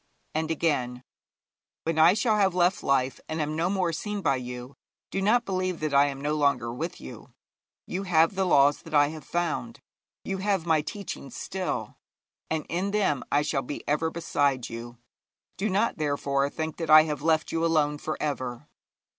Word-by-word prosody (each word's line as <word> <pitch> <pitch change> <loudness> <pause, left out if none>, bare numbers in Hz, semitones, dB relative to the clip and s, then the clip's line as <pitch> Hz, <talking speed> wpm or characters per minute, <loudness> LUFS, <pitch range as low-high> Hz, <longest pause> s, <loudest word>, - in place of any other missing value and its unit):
And 160 0 -1
again: 130 -6 -1 0.8
'When 165 -1 -1
I 165 +4 +7
shall 220 0 +2
have 190 -3 +2
left 180 +2 +2
life 135 -1 +1
and 155 - -3
am 155 0 -1
no 165 +3 +1
more 185 -4 0
seen 205 +5 -3
by 135 -4 +2
you, 125 +1 -7 0.4
do 195 - -1
not 235 +4 +3
believe 185 -2 -1
that 155 -2 -1
I 140 +1 +6
am 135 -1 -5
no 145 +2 -1
longer 140 -6 +1
with 165 +7 -5
you. 65 - -10 0.6
You 185 - -3
have 165 0 +4
the 190 -1 0
laws 145 -3 +4
that - - -6
I 145 0 +5
have 155 -1 -8
found, 175 - -2 0.4
you 195 -1 -3
have 195 -3 0
my 160 -2 +3
teachings 195 -4 -7
still, 180 - -4 0.5
and 160 -1 -1
in 185 +4 -1
them 200 -9 +1
I 145 +1 +3
shall 145 -2 0
be 135 +3 -7
ever 150 +2 +1
beside 145 -6 0
you. 120 +1 -8 0.6
Do 210 +3 -1
not, 200 -1 +1
therefore, 140 -2 0
think 160 +1 -4
that 165 -2 -4
I 155 0 +9
have 150 -3 -3
left 160 0 +1
you 165 0 -1
alone 150 -3 +2
for 155 - -3
ever.' 130 -5 -3
155 Hz, 185 wpm, -27 LUFS, 140-180 Hz, 0.8 s, I